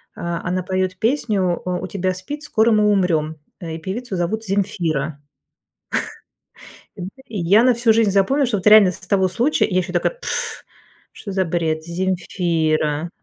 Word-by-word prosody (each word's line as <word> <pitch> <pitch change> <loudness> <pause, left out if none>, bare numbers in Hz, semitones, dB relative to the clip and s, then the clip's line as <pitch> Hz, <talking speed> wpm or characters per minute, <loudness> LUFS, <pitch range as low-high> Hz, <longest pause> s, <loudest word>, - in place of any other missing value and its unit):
А, 170 0 -4
она 180 +1 -1
поёт 185 0 -1
песню" 210 -7 0
У 180 0 -2
тебя 185 0 -1
спид, 285 +12 -7
скоро 230 -6 +2
мы 210 -1 +4
умрём."Э, 160 -3 -1
и - - -5
певицу 195 +5 -5
зовут 185 +6 -2
Земфира." 165 -7 -1 1.7
И 210 +4 -8
я 195 +7 +4
на 250 0 +5
всю 235 -1 +3
жизнь 220 -2 +3
запомнила, 255 +9 +2
что 225 -4 0
вот 190 - -2
реально 210 -3 +8
с - - -9
с 180 - -15
того 190 -1 +2
случая 240 +11 +1
я 185 - 0
ещё 180 0 -4
такая: 175 - +1
"Пф, - - -4 0.5
что 200 - -8
за 190 -1 0
бред, 160 -2 -1
Земфира. 170 -3 -1
185 Hz, 160 wpm, -20 LUFS, 170-215 Hz, 1.7 s, реально